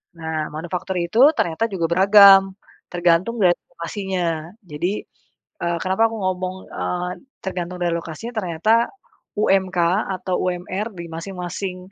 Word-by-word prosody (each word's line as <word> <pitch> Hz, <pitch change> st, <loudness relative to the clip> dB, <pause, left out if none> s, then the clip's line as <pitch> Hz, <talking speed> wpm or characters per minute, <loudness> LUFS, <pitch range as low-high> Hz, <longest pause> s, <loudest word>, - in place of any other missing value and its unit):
Nah, 160 Hz, -2 st, -3 dB
manufaktur 175 Hz, +3 st, -4 dB
itu 175 Hz, +5 st, -1 dB, 0.2 s
ternyata 170 Hz, +7 st, 0 dB
juga 190 Hz, -5 st, -2 dB
beragam, 195 Hz, +1 st, +7 dB, 0.3 s
tergantung 175 Hz, +5 st, +1 dB
dari 175 Hz, -1 st, +4 dB, 0.2 s
lokasinya. 170 Hz, -1 st, -3 dB
Jadi, 175 Hz, +4 st, -3 dB, 0.6 s
eee, 170 Hz, 0 st, 0 dB
kenapa 190 Hz, +4 st, +1 dB
aku 225 Hz, -, -6 dB
ngomong, 185 Hz, 0 st, -2 dB, 0.2 s
eee, 180 Hz, 0 st, -2 dB, 0.3 s
tergantung 180 Hz, -2 st, -4 dB
dari 175 Hz, -, +1 dB
lokasinya, 170 Hz, +8 st, -6 dB
ternyata 215 Hz, +5 st, +2 dB, 0.5 s
UMK 190 Hz, -3 st, +2 dB, 0.4 s
atau 185 Hz, 0 st, -3 dB
UMR 185 Hz, +4 st, -2 dB
di 170 Hz, -, -5 dB
masing-masing 180 Hz, +2 st, -5 dB
180 Hz, 120 wpm, -21 LUFS, 170-195 Hz, 0.6 s, beragam